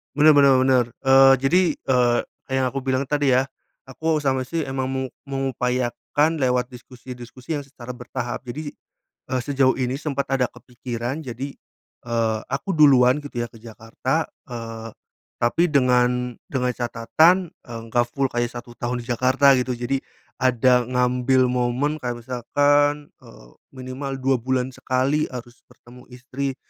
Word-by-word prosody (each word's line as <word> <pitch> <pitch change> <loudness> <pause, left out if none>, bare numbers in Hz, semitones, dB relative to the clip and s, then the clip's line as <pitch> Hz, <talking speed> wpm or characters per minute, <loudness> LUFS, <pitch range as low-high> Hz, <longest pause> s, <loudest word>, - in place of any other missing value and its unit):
Bener 150 +1 +7
bener 140 -2 +6
bener. 130 -2 +3 0.2
Eee, 135 0 +7
jadi, 175 +7 +4
eee, 125 -2 +2 0.3
yang 130 -1 0
aku 135 - -3
bilang 130 0 0
tadi 140 -1 +1
ya, 130 - +4 0.4
aku 160 +5 -2
sama 130 -2 0
istri 165 +2 -2
emang 135 -1 -3
meng 130 -1 -3 0.2
mengupayakan 135 +3 -1
lewat 125 -2 +1
diskusi-diskusi 125 +1 -11
yang 140 - -10
secara 125 -3 -9
bertahap. 125 0 -5
Jadi, 145 +4 -5 0.6
eee, 130 - +1
sejauh 135 -1 +2
ini 130 +1 -2
sempat 140 -3 -2
ada 130 -2 +2
kepikiran, 125 +2 -6
jadi, 130 +2 -5 0.6
eee, 115 -2 0
aku 135 +8 -3
duluan 140 -5 +5
gitu 120 -4 -4
ya - - -4
ke 115 - -15
Jakarta, 115 +7 -3 0.2
eee, 115 -2 -7 0.5
tapi 140 +9 +2
dengan 125 -2 +2
dengan 125 -2 -1
catatan, 125 +10 +2 0.2
eee, 115 -1 -7
nggak 120 0 +3
full 135 -2 -1
kayak 120 0 -1
1 120 0 -8
tahun 120 0 -3
di - - -16
Jakarta 130 +3 +4
gitu. 125 0 -2
Jadi, 125 +3 -2 0.4
ada 125 0 +3
ngambil 125 +1 +2
momen 125 +5 0
kayak 120 -3 -5
misalkan, 145 +4 +1
eee, - - -16 0.3
minimal 130 +1 -5
2 135 +1 +2
bulan 130 +1 -1
sekali 130 +4 0
harus 120 -1 -9
bertemu 125 0 -17
istri, 130 +2 -4
130 Hz, 145 wpm, -23 LUFS, 125-135 Hz, 0.6 s, Bener